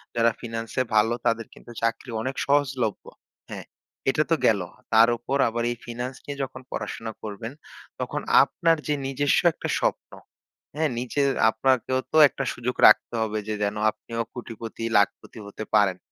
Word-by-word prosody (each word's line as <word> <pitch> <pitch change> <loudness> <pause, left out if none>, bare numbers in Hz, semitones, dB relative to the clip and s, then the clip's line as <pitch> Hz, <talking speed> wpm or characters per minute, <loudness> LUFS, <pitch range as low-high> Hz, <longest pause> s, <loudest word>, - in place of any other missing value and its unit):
যারা 115 0 +4
ফিন্যান্সে 115 0 -3
ভালো 110 +2 +4
তাদের 115 -1 0
কিন্তু 120 - -14
চাকরি 115 +2 -1
অনেক 130 +3 -3
সহজলভ্য। 135 -6 +1 0.5
হ্যাঁ, - - -7 0.4
এটা 150 +3 +2
তো 165 - +6
গেল। 100 -4 +4 0.3
তার 115 +1 +7
উপর 135 +4 -2
আবার 120 +1 -2
এই - - -3
ফিন্যান্স 120 +2 -5
নিয়ে 145 -1 -6
যখন 130 0 -7
পড়াশোনা 115 -1 -5
করবেন 110 +2 -6 0.5
তখন - - -3 0.2
আপনার 165 -1 +2
যে 150 - +1
নিজস্ব 135 +1 +2
একটা - - -5
স্বপ্ন, - - -1 0.6
হ্যাঁ? 155 +1 +1
নিজে 125 +3 -1 0.3
আপনাকেও 130 +2 +1
তো - - +1
একটা 135 - -4
সুযোগ 125 +1 -4
রাখতে - - +5
হবে 110 -1 -1
যে 110 - -1
যেন 100 +1 -1
আপনিও 115 +2 -7
কোটিপতি, 115 -1 -7
লাখপতি 100 +3 -1
হতে 110 - -7
পারেন। 95 -3 +3
120 Hz, 155 wpm, -25 LUFS, 110-130 Hz, 0.6 s, তার